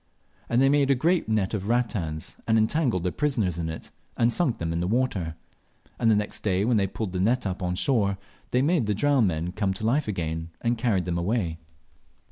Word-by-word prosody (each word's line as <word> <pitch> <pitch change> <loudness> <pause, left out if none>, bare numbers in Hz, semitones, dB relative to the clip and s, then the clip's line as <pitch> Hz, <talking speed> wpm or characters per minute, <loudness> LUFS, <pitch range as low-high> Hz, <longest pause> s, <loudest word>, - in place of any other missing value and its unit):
And 120 +3 +3
they - - +5
made 140 0 +3
a 140 - +5
great 165 +2 +1
net 105 -3 +1
of 100 -2 -3
rattans, 105 -10 -1
and 110 0 +4
entangled 110 - +1
their 90 - 0
prisoners 110 - 0
in 80 -1 -2
it, 80 - -8 0.3
and 120 0 +3
sunk 170 -10 +1
them 80 0 -2
in 85 - -1
the 90 - -1
water; 100 -8 0 0.6
and 115 - +3
the 110 - +5
next 105 0 -2
day, 95 -1 +1
when 120 -1 +3
they 100 -1 +2
pulled 100 0 -5
the 90 - -2
net 115 +6 +1
up 95 -2 -3
on 90 -1 -1
shore, 100 -3 +1 0.3
they 125 +1 +2
made 150 -6 +2
the 105 - +1
drowned 135 -1 +3
men 85 0 -2
come 95 -1 -1
to 110 - -4
life 135 +5 +1
again, 80 -4 -3
and 120 0 +1
carried 105 -7 +1
them 85 -1 -1
away. 85 -3 -1
105 Hz, 220 wpm, -26 LUFS, 90-125 Hz, 0.6 s, they